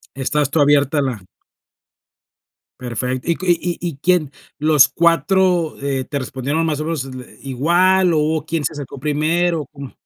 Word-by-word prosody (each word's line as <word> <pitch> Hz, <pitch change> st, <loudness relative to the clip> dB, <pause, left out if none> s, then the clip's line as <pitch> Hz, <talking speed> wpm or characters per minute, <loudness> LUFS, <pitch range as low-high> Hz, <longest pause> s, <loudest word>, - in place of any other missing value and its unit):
Estás 140 Hz, +1 st, 0 dB
tú 155 Hz, -, +1 dB
abierta 145 Hz, 0 st, +3 dB
a -, -, +2 dB
la 125 Hz, -7 st, -3 dB, 1.6 s
Perfe 125 Hz, +1 st, -3 dB
¿Y 170 Hz, -1 st, 0 dB
q 185 Hz, -, -7 dB
y 175 Hz, 0 st, 0 dB
y 175 Hz, -, -2 dB
y 160 Hz, -, -7 dB
quién 165 Hz, -3 st, +1 dB, 0.3 s
los 150 Hz, -3 st, +5 dB
4, 170 Hz, +2 st, +2 dB
eh, 135 Hz, -2 st, -2 dB
te 145 Hz, -, -4 dB
respondieron, 135 Hz, +4 st, -2 dB
más 150 Hz, -2 st, -1 dB
o -, -, -2 dB
menos, 160 Hz, -4 st, -2 dB
le 130 Hz, -2 st, -10 dB
igual, 175 Hz, +7 st, +2 dB
o 160 Hz, -, +2 dB
hubo 155 Hz, 0 st, 0 dB
quién 160 Hz, -1 st, -2 dB
se -, -, -1 dB
acercó 145 Hz, -2 st, -8 dB
primero? 160 Hz, +4 st, 0 dB
¿O -, -, -11 dB
cómo? 140 Hz, -1 st, -10 dB
150 Hz, 180 wpm, -19 LUFS, 135-165 Hz, 1.6 s, los